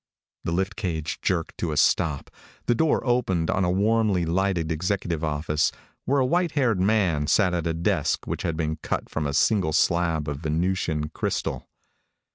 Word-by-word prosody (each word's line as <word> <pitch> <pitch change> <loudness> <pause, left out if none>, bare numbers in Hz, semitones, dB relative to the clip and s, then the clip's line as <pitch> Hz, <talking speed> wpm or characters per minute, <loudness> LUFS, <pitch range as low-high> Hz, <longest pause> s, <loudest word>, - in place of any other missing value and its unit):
The - - -1
lift 95 +3 -1
cage 85 -8 -3
jerked 85 -4 -1
to 85 - -1
a 75 - -3
stop. 75 -1 +2 0.3
The - - +3
door 155 +4 +1
opened 115 -10 +1
on 95 - +1
a 90 - +1
warmly 100 -1 +2
lighted 85 -1 0
executive 85 -1 -1
office 75 0 0 0.3
where 140 +2 +2
a 130 - +3
white 170 +4 +1
haired 125 -9 +2
man 95 -8 +2
sat 95 +1 +3
at 85 -1 -1
a 80 - 0
desk 85 -2 0
which - - -3
had 80 -2 -2
been 80 -1 -1
cut - - -3
from 75 -2 -2
a 70 - -3
single 90 -2 +2
slab 85 -3 +1
of 75 -1 -3
Venusian 80 -1 -1
crystal. - - -3
85 Hz, 175 wpm, -25 LUFS, 80-100 Hz, 0.3 s, The